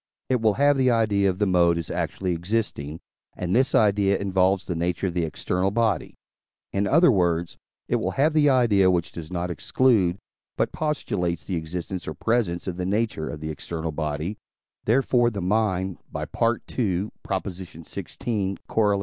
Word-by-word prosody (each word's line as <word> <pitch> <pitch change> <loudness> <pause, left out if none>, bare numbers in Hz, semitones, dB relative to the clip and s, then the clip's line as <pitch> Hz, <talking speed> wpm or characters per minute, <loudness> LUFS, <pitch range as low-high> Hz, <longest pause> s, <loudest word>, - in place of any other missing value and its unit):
it 125 -3 +2
will 110 -2 +3
have 145 0 +4
the 130 -1 +3
idea 105 -4 +3
of 90 - -2
the 105 - +2
mode 85 -3 +3
as 85 - -4
actually 95 -1 -2
existing, 85 -5 -2 0.4
and 90 +2 -1
this 130 +2 +3
idea 100 -2 +3
involves 95 -1 +1
the 90 - -3
nature 85 +2 -1
of 90 - -1
the 85 -1 0
external 90 +4 -1
body. 115 +1 0 0.6
In 100 +1 +1
other 165 0 +5
words, 85 -4 +1 0.3
it - - +1
will - - -1
have 150 +3 +2
the 150 -2 +4
idea 110 -8 +4
which 85 -1 0
does 80 -1 -8
not 90 0 -2
exclude, 95 - +2 0.4
but - - +1
postulates 100 - -2
the 95 - -2
existence 85 +2 -4
or 80 - -4
presence 105 - 0
of 90 -2 -4
the 90 - -2
nature 100 -5 -1
of 75 - -7
the 80 0 -3
external 80 +1 -4
body; 75 +5 -3 0.5
therefore 120 0 +3
the 105 -4 -5
mind 95 -1 0
(by - - -3
II. 115 0 -1 0.5
xvi., 95 - -4
Coroll. 105 -3 +2
95 Hz, 165 wpm, -25 LUFS, 85-110 Hz, 0.6 s, other